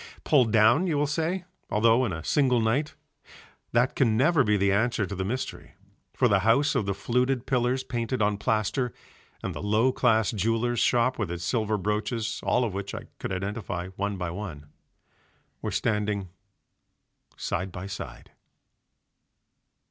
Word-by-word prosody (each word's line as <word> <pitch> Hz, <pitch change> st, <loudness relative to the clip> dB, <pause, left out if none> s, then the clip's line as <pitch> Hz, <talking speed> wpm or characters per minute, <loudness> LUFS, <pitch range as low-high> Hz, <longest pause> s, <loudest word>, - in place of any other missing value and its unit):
Pulled 130 Hz, -7 st, +3 dB
down, 110 Hz, -, +5 dB
you 155 Hz, -4 st, +1 dB
will 145 Hz, -, +2 dB
say, 165 Hz, +5 st, -1 dB, 0.2 s
although 115 Hz, +3 st, +4 dB
in 110 Hz, -, -2 dB
a 80 Hz, -2 st, -5 dB
single 130 Hz, -, +2 dB
night. 120 Hz, +7 st, 0 dB, 0.8 s
That 125 Hz, +2 st, +2 dB
can 115 Hz, -5 st, +2 dB
never 150 Hz, +3 st, +4 dB
be 105 Hz, -2 st, +2 dB
the 100 Hz, 0 st, +2 dB
answer 110 Hz, +1 st, +1 dB
to 100 Hz, -, -6 dB
the 95 Hz, -1 st, -2 dB
mystery, 125 Hz, +7 st, -5 dB, 0.4 s
for -, -, +2 dB
the 100 Hz, -, +3 dB
house 120 Hz, +9 st, +3 dB
of 100 Hz, -, 0 dB
the 100 Hz, -, 0 dB
fluted 125 Hz, +4 st, 0 dB
pillars 130 Hz, 0 st, +1 dB
painted 125 Hz, 0 st, -2 dB
on 105 Hz, -1 st, +1 dB
plaster 115 Hz, +3 st, 0 dB, 0.5 s
and -, -, -3 dB
the -, -, -6 dB
low 110 Hz, +5 st, +2 dB
class 110 Hz, -5 st, +2 dB
jeweller's 115 Hz, +3 st, 0 dB
shop 125 Hz, +1 st, +2 dB
with 105 Hz, -6 st, -1 dB
its 85 Hz, 0 st, -5 dB
silver 110 Hz, +2 st, 0 dB
brooches 105 Hz, +2 st, -2 dB
(all 125 Hz, -, +2 dB
of 110 Hz, -5 st, -2 dB
which 100 Hz, 0 st, -5 dB
I -, -, -8 dB
could -, -, -4 dB
identify 95 Hz, -1 st, -3 dB
one 100 Hz, +1 st, -3 dB
by 90 Hz, -2 st, -3 dB
one) 85 Hz, -6 st, -7 dB, 0.9 s
were -, -, -2 dB
standing 105 Hz, -3 st, -1 dB, 1.1 s
side 90 Hz, +2 st, -3 dB
by 90 Hz, +2 st, -7 dB
side. 100 Hz, -, -8 dB
110 Hz, 160 wpm, -27 LUFS, 100-125 Hz, 1.1 s, down